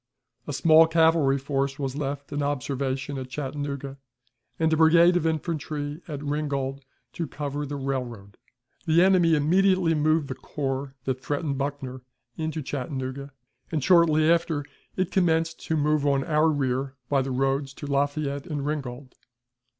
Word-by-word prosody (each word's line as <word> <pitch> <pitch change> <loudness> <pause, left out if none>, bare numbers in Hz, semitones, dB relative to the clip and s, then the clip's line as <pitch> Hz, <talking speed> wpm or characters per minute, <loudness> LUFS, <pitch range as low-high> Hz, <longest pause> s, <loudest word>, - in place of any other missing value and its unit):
A - - -3
small 160 -1 +6
cavalry 160 -4 +3
force 135 0 -2
was 135 -2 -3
left 140 0 -4
in 145 - -1
observation 140 0 -2
at 130 -1 -7
Chattanooga, 140 0 -5 0.6
and 160 -1 +2
a - - +2
brigade 170 +2 +6
of 165 -2 +2
infantry 155 -1 -3
at 150 -3 -6
Ringgold 140 -2 -2 0.3
to 165 - -3
cover 145 +1 -4
the 145 - -4
railroad. 125 -7 -4 0.5
The 165 +2 +5
enemy 180 -4 +4
immediately 180 +3 +3
moved 155 -1 +2
the 135 - -3
corps 135 0 -4
that 130 -1 -2
threatened 145 -1 -2
Buckner 135 -2 -4 0.3
into 160 -1 -3
Chattanooga, 135 0 -4 0.4
and, 155 -5 -1
shortly 165 -3 +5
after, 165 -4 +1 0.3
it 185 -1 -1
commenced 165 -3 +1
to 160 - +1
move 150 0 +2
on 140 -1 +2
our 155 +1 +3
rear 135 -2 -1
by 140 0 +2
the 135 - -3
roads 135 +1 0
to - - -8
Lafayette 140 +1 -1
and 145 -4 -3
Ringgold. 135 -3 -4
145 Hz, 150 wpm, -26 LUFS, 135-160 Hz, 0.6 s, small